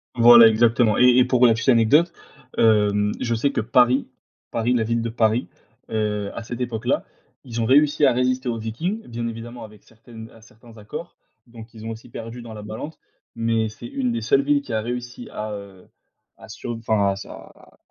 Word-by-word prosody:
Voilà, 120 -1 +8
exactement, 115 0 +3
et- 125 0 +5
et 125 - +5
pour 125 -1 +3
la 115 - +6
petite 115 +4 -1
anecdote, 130 +8 +4 0.5
hem, 105 -2 +3
je 120 -1 -1
sais 140 +5 0
que - - -1
Paris 125 +3 +3 0.4
Paris 115 +2 0
la 115 -2 +1
ville 115 +1 -1
de 115 - -3
Paris, 115 +1 +1 0.4
heu, 105 -2 -2
à - - -6
cette 120 +2 -7
époque-là, 115 -3 -2 0.4
ils 120 -3 -5
ont - - 0
réussi 145 +4 +4
à 130 - +4
résister 125 0 0
aux 115 - -2
Vikings, 160 - -4
bien 115 0 -4
évidemment 115 +1 -8
avec 105 -2 -14
certaines 115 0 -13
à 115 - -18
certains 115 +1 -18
accords, 110 +11 -9 0.3
donc 115 0 -13
ils 110 0 -11
ont - - -4
aussi 115 +2 -10
perdu 115 +1 -8
dans 115 -1 -10
la 105 -1 -9
balance, 110 +9 -7 0.4
mais 115 -1 0
c'est 110 +2 -12
une 125 -2 -2
des 115 -1 -3
seules 135 +5 +3
villes 145 0 +1
qui 120 - -8
a 110 - 0
réussi 120 +1 -6
à, 105 0 -5
heu, 100 -2 -11 0.5
à - - -14
sur - - -7
enfin 110 -3 +1
à 95 - -1
sur 100 - -10
à - - -15
115 Hz, 205 wpm, -22 LUFS, 110-125 Hz, 0.5 s, Voilà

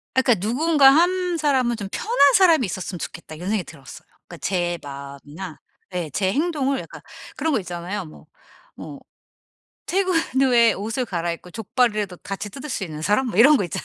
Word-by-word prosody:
아 260 - +5
그러니까 220 -7 +1
'누군가 290 +3 +5
1 355 +3 +2
사람은 265 -6 +1
좀 205 -3 -5
편한 355 - +3
사람이 335 -9 +5
있었으면 185 -1 -5
좋겠다.' 155 +1 -8
이런 175 +5 -6
생각이 210 -3 0
들었어요. 140 -5 -13 0.2
그러니까 - - -10
제 175 -2 -1
마음이나 140 +4 -9 0.3
예 175 -3 -3
제 190 +5 0
행동을 280 - 0
약간 - - -10 0.3
그런 320 -1 -1
거 - - +2
있잖아요. 180 +1 -5
뭐 155 - -14 0.5
뭐 - - -10 0.9
퇴근 375 0 +1 0.3
후에 235 -4 +4
옷을 225 +5 -3
갈아 170 -4 -2
입고 175 +1 -10
족발이라도 210 -3 -1
같이 200 +1 -6
뜯을 275 +7 -8
수 225 -7 -3
있는 155 -3 -7
사람 210 +10 +2
뭐 210 - -4
이런 285 +6 +8
거 205 - 0
있잖아요. 175 - -5
210 Hz, 390 characters per minute, -22 LUFS, 175-275 Hz, 0.9 s, 이런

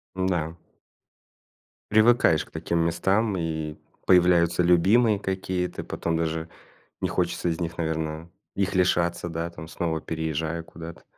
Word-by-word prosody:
Н-да. 90 -4 -1 1.4
Привыкаешь 110 -7 +4
к - - -23
таким 85 - -2
местам, 95 +5 +1
и 80 -2 -3 0.3
появляются 90 -1 +4
любимые 100 +5 +4
какие-то, 95 -2 -3
потом 85 -1 -2
даже 80 0 -2 0.5
не - - +1
хочется 85 - -1
из 80 - -2
них, 80 -1 -3
наверное 80 0 -3 0.3
их 100 0 -1
лишаться, 85 -1 +1
да, 85 +1 -3
там 80 -1 -10
снова 80 -1 -2
переезжая 80 +1 -3
куда-то. 85 0 -10
85 Hz, 125 wpm, -25 LUFS, 80-90 Hz, 1.4 s, Привыкаешь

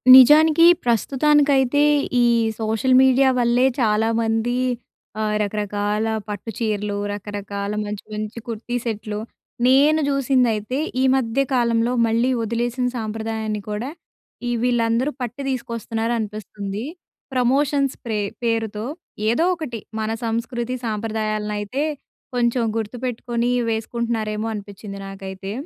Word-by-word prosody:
నిజానికి, 305 +5 +8 0.2
ప్రస్తుతానికైతే, 275 +3 +3 0.4
ఈ - - +5 0.3
సోషల్ 225 +4 +1
మీడియా 265 +1 +5
వల్లే 240 +1 +3 0.2
చాలామంది 225 +2 +1 0.6
ఆహ్, 215 0 0
రకరకాల 210 +1 -1 0.2
పట్టు 205 +2 -5
చీరలు, 210 -2 -1
రకరకాల 205 0 -5
మంచి, 210 0 -5
మంచి 215 +2 -4
కుర్తీ 230 +1 -4
సెట్‌లు 215 -2 -3 0.5
నేను 290 +4 +5
చూసిందైతే 255 -4 +1 0.2
ఈ - - +3
మధ్య 260 0 +1
కాలంలో 235 -1 +2 0.2
మళ్ళీ 230 +3 +2
వదిలేసిన 240 +3 -1
సాంప్రదాయాన్ని 220 -1 -3
కూడా 210 +5 -3 0.6
ఈ - - 0
వీళ్ళందరూ 240 +2 +1
పట్టి 245 +2 -4
తీసుకొస్తున్నారనిపిస్తుంది. 225 -4 -3 0.5
ప్రమోషన్స్ 275 +2 +2
ప్రే 220 -2 -1 0.2
పేరుతో 225 -2 -1 0.5
ఏదో 245 +9 +2
ఒకటి 285 -9 -5 0.2
మన 220 0 -1
సంస్కృతి 235 +2 -2
సాంప్రదాయాలనైతే 215 +2 -2 0.5
కొంచెం 240 0 +2
గుర్తుపెట్టుకొని, 240 +1 -2 0.2
వేసుకుంటున్నారేమో 225 -1 -2
అనిపిచ్చింది 200 -1 -8
నాకైతే. 195 0 -7
230 Hz, 100 wpm, -22 LUFS, 210-250 Hz, 0.6 s, నిజానికి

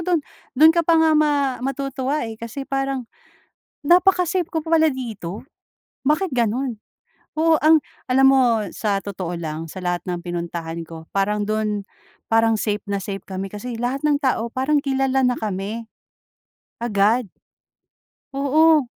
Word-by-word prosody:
do'n, 340 -2 +1 0.4
do'n 315 +3 +8
ka 340 - +3
pa 335 0 +3
nga 320 0 +4
ma 285 -4 +2
matutuwa 275 +1 -2
eh, 225 -1 -7
kasi 235 +4 -6
parang, 270 -2 -2 0.8
napaka-safe 360 +1 +3
ko 320 -2 -3
pala 320 -1 +3
dito, 215 -7 -6 0.6
bakit 300 +3 +1
gano'n? 240 +1 0 0.6
Oo, 320 0 +4
ang 315 0 +7 0.3
alam 265 +1 +4
mo 270 -1 +5 0.3
sa 205 -3 0
totoo 185 -4 -5
lang, 160 -1 -4
sa 175 +4 -8
lahat 175 -1 -2
ng 175 -1 -3
pinuntahan 170 -1 -5
ko 160 0 -11
parang 205 +1 0
do'n, 215 -2 -1 0.4
parang 225 0 +4
safe 210 -1 -1
na 200 -1 -2
safe 195 0 -5
kami 190 0 -5
kasi 220 +5 -6
lahat 255 +4 -2
ng 290 -1 +3
tao 235 -3 0
parang 270 +4 +1
kilala 270 -1 +1
na 250 - +3
kami, 215 +2 -4 1.0
agad. 220 +2 +2 1.1
Oo, 305 +2 +4
250 Hz, 140 wpm, -22 LUFS, 205-290 Hz, 1.1 s, do'n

